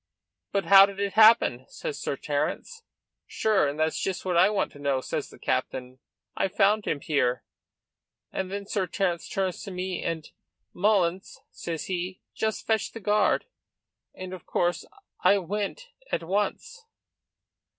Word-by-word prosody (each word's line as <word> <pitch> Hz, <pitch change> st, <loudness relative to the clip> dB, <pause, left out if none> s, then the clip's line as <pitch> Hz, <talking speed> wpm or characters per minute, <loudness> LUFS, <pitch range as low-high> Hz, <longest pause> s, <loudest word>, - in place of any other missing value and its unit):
'But 200 Hz, -3 st, 0 dB
how 195 Hz, +2 st, +9 dB
did 200 Hz, -1 st, -9 dB
it 200 Hz, -1 st, -1 dB
happen?' 215 Hz, -, +5 dB
says 475 Hz, -3 st, -6 dB
Sir -, -, -2 dB
Terence. 460 Hz, -2 st, -3 dB, 0.5 s
'Sure 210 Hz, -8 st, +2 dB
and 145 Hz, +2 st, -4 dB
that's 160 Hz, 0 st, 0 dB
just 190 Hz, -1 st, -2 dB
what 180 Hz, -1 st, 0 dB
I 170 Hz, -, +6 dB
want 210 Hz, -2 st, 0 dB
to 145 Hz, -, -14 dB
know,' 140 Hz, -2 st, +1 dB
says -, -, -4 dB
the -, -, -14 dB
captain; 130 Hz, 0 st, -2 dB, 0.4 s
'I -, -, +1 dB
found 205 Hz, +2 st, +2 dB
him 145 Hz, -, -1 dB
here.' 125 Hz, -5 st, 0 dB, 0.9 s
And 190 Hz, 0 st, -3 dB
then 200 Hz, 0 st, -4 dB
Sir 195 Hz, -2 st, -1 dB
Terence 175 Hz, -4 st, -1 dB
turns 190 Hz, -2 st, -2 dB
to 200 Hz, -, -7 dB
me, 185 Hz, -1 st, -3 dB
and 165 Hz, -2 st, -3 dB, 0.5 s
'Mullins,' 190 Hz, -2 st, +1 dB
says 165 Hz, -2 st, -5 dB
he, 185 Hz, 0 st, -3 dB
'just 220 Hz, -1 st, -2 dB
fetch 220 Hz, -2 st, 0 dB
the 225 Hz, -, -7 dB
guard,' 210 Hz, +1 st, +2 dB, 0.7 s
and 185 Hz, 0 st, -7 dB
of 185 Hz, -, -10 dB
course, 175 Hz, 0 st, 0 dB, 0.4 s
I 200 Hz, -, +6 dB
went 205 Hz, -, -4 dB, 0.2 s
at -, -, -1 dB
once." 210 Hz, -, -2 dB
190 Hz, 155 wpm, -27 LUFS, 170-205 Hz, 0.9 s, how